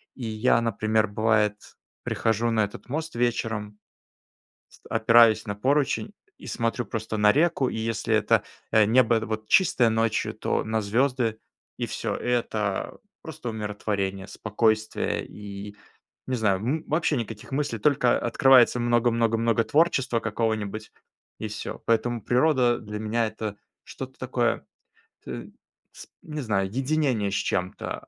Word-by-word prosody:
И 125 - -6
я, 110 +2 +2
например, 110 -1 +1
бывает, 105 0 +2 0.5
прихожу 115 +1 0
на 110 -2 +2
этот 105 - -11
мост 160 0 -4
вечером. 115 -3 -2 0.9
Ст - - -21
опираюсь 115 0 +5
на 100 - -3
поручень 140 - 0 0.3
и - - -12
смотрю 115 +1 -1
просто 110 0 -4
на 105 0 +5
реку, 150 -4 +2
и - - -4
если 110 0 -1
это, 110 - +3 0.3
э, 110 -1 +6
небо 115 -1 +4
вот 110 0 -5
чистое 145 -10 +4
ночью, 110 0 0
то - - -1
на 110 0 -1
звёзды, 115 +1 0 0.4
и - - -1
всё. - - -3
Это 110 -5 -2 0.2
просто 150 -6 -7
умиротворение, 100 -2 -3
спокойствие 110 0 0
и, 100 0 -9 0.5
не 130 - -2
знаю, 100 -4 +2
м, 145 +9 -2
вообще 155 -1 +1
никаких 115 0 -6
мыслей, 140 -5 -1
только 125 0 +3
открывается 125 +1 +5
много 120 0 +2
много 115 -1 +1
много 115 0 +2
творчества 140 -7 +2
какого-нибудь 110 -1 -2 0.5
и - - -4
всё. - - -6
Поэтому 115 +1 +1
природа 125 -1 +3
для 105 0 -6
меня 110 +1 0
это 110 -1 -5 0.3
что-то 130 0 -9
такое, 125 -2 -1 0.6
т - - -7 0.4
с - - -12 0.2
не 150 -2 -5
знаю, 95 -6 0
единение 130 -5 0
с - - -1
чем-то, 90 +1 -3
115 Hz, 140 wpm, -25 LUFS, 105-125 Hz, 0.9 s, э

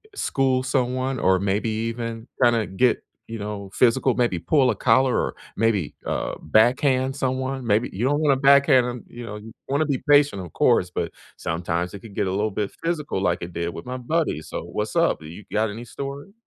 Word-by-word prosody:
school 130 - +1
someone 130 0 -1
or 95 -2 +3
maybe 100 +3 0
even 115 +1 -4 0.2
kinda 115 -3 +4
get, 115 +6 +1 0.2
you 115 0 -6
know, 105 -1 -5
physical, 125 +2 +3
maybe 120 -8 +1
pull 130 - +3
a - - -3
collar 125 +4 +3
or - - -1 0.2
maybe, 105 -7 +1
uh, - - -2
backhand 130 - +3
someone? 130 -1 -2
Maybe 110 +3 +2
you 105 +6 -3
don't 145 +3 +2
wanna 150 -3 +3
backhand 140 -1 +5
'em, 120 -1 -5
you 120 - -9
know? 105 - -6
You 105 +1 -10 0.2
wanna 140 +3 +1
be 140 -4 -1
patient, 145 -9 +5
of 85 - -11
course, - - +3
but - - -3 0.3
sometimes 85 +2 -2
it 100 - -7
could 105 -2 -13
get - - 0
a 95 - -1
little 105 +3 0
bit 100 0 -2
physical 150 - -2
like 90 -3 0
it 85 - -7
did 85 0 -3
with 85 - -8
my 125 +1 -4
buddy. 150 - -1
So, - - -6
what's - - -4
up? - - +2
You 85 +6 -10
got 110 +1 +1
any 115 +4 -7
story? 140 - -7
120 Hz, 200 wpm, -23 LUFS, 100-130 Hz, 0.3 s, backhand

